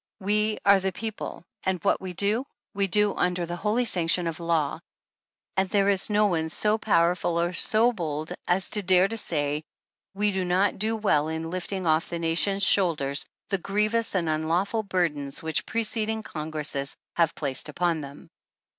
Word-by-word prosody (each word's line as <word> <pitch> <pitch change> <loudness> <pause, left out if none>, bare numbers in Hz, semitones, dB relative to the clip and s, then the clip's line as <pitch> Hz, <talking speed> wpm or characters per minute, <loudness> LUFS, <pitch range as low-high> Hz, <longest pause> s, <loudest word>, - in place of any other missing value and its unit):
"We 210 +2 0
are 200 0 +6
the 190 0 -2
people 215 -1 -6 0.2
and 190 -1 -1
w'hat 200 - +1
we 185 -1 -6
do, 210 +8 +2 0.3
we 200 -1 +1
do 210 +2 +2
under 180 -1 -1
the 175 +1 -5
holy 215 +7 0
sanction 175 -3 +3
of 165 -1 -4
law*, 165 -3 -1 0.8
and 190 -1 0
there 200 0 +2
is 195 0 +4
no 210 0 +3
one 160 -5 0
so 210 +7 +1
powerful 175 -4 +1
or 175 +1 0
so 225 +6 +4
bold 155 -5 -4
as 185 +2 +1
to 210 - +4
dare 185 0 +4
to 225 - -5
say 150 -7 0 0.5
we 205 +1 +1
do 190 -1 -2
not 185 +3 +1
do 220 +2 0
w^ell 160 -8 +1
in 160 +1 -4
lifting 185 +1 -4
off 160 0 +1
the 170 - -3
nation's 170 +5 +1
shoulders 155 -8 +2 0.2
the 195 - 0
grievous 210 +4 0
and 175 -3 0
unlawful 165 +8 0
burdens 165 -8 -1
w^hich 160 -1 -2
preceding 220 -1 -1
Congresses 150 -5 -3 0.2
have 165 -2 +2
placed 140 -1 -2
upon 170 +1 -1
them." 140 0 -11
180 Hz, 175 wpm, -26 LUFS, 160-205 Hz, 0.8 s, are